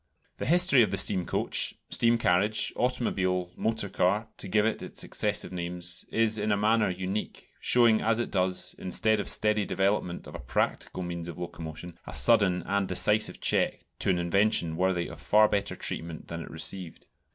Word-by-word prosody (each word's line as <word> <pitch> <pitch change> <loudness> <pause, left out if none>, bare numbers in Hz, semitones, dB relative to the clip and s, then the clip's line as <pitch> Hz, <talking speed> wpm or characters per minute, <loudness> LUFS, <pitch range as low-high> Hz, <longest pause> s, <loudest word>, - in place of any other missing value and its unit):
The - - -4
history 175 -4 +6
of 110 - +3
the 100 - -2
steam 95 -2 +2
coach, - - +1 0.2
steam 115 0 +3
carriage, 105 +1 +1
automobile, 95 -8 -1
motor 110 -2 -1
car 100 +3 0
to - - -7
give 105 +2 +2
it 110 - -1
its - - -7
successive 105 -1 -1
names 90 0 -2
is 110 -1 +1
in 105 +1 -1
a 100 - +2
manner 105 +1 +2
unique, 95 +3 -5
showing 115 -3 +4
as 115 0 +1
it 120 - -3
does, 90 -1 +1
instead 110 +4 0
of 100 - -3
steady 105 -1 +1
development 95 -2 -1
of - - -11
a - - -7
practical 95 - -2
means 85 -1 -5
of 85 - -8
locomotion, 85 -1 -8
a - - -6
sudden 100 -6 +4
and 100 -1 -1
decisive 95 +4 +1
check - - 0
to - - +1
an 90 - +2
invention 85 -1 +1
worthy 90 0 0
of 85 0 -10
far 105 +3 +4
better 100 -1 -2
treatment 80 -1 -4
than 85 0 -5
it - - -9
received. 80 +2 -5
95 Hz, 180 wpm, -28 LUFS, 90-110 Hz, 0.2 s, history